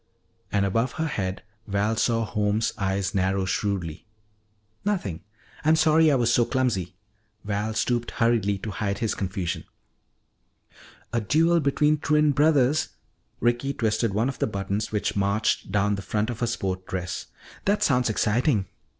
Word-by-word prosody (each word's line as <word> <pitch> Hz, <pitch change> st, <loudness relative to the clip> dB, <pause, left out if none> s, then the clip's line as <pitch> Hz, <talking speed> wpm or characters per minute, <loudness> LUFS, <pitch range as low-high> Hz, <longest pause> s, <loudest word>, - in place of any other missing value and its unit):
And 100 Hz, -1 st, +2 dB
above 115 Hz, +6 st, 0 dB
her 160 Hz, -, -2 dB
head 95 Hz, -10 st, -3 dB, 0.2 s
Val 100 Hz, +2 st, 0 dB
saw 115 Hz, 0 st, +1 dB
Holmes' 105 Hz, +1 st, 0 dB
eyes 95 Hz, 0 st, -1 dB
narrow 95 Hz, 0 st, +1 dB
shrewdly. 95 Hz, -3 st, -2 dB, 0.8 s
"Nothing. 175 Hz, -, -2 dB, 0.4 s
I'm 155 Hz, +1 st, +5 dB
sorry 160 Hz, 0 st, +4 dB
I -, -, +4 dB
was 120 Hz, -2 st, +2 dB
so 120 Hz, -, +4 dB
clumsy." 110 Hz, -, -1 dB, 0.5 s
Val 105 Hz, +1 st, -2 dB
stooped 120 Hz, 0 st, 0 dB
hurriedly 115 Hz, -4 st, +2 dB
to 110 Hz, -, -3 dB
hide 100 Hz, -1 st, -2 dB
his 110 Hz, 0 st, -1 dB
confusion. 95 Hz, -2 st, -3 dB, 1.5 s
"A 115 Hz, -, +1 dB
duel 165 Hz, +9 st, +3 dB
between 150 Hz, +1 st, +2 dB
twin 150 Hz, 0 st, +3 dB
brothers." 145 Hz, 0 st, +3 dB, 0.5 s
Ricky 120 Hz, +4 st, +1 dB
twisted 110 Hz, 0 st, 0 dB
one 110 Hz, +4 st, +2 dB
of 135 Hz, -, -4 dB
the -, -, +1 dB
buttons 100 Hz, 0 st, -3 dB
which 105 Hz, -1 st, -1 dB
marched 100 Hz, +2 st, 0 dB
down 105 Hz, 0 st, +2 dB
the 100 Hz, -, -3 dB
front 105 Hz, +4 st, -1 dB
of 115 Hz, -, -7 dB
her 120 Hz, -, 0 dB
sport 95 Hz, -5 st, -3 dB
dress. 90 Hz, -3 st, -4 dB, 0.4 s
"That 205 Hz, +1 st, +2 dB
sounds 125 Hz, -4 st, +2 dB
exciting." 110 Hz, 0 st, +1 dB
110 Hz, 150 wpm, -25 LUFS, 100-130 Hz, 1.5 s, I'm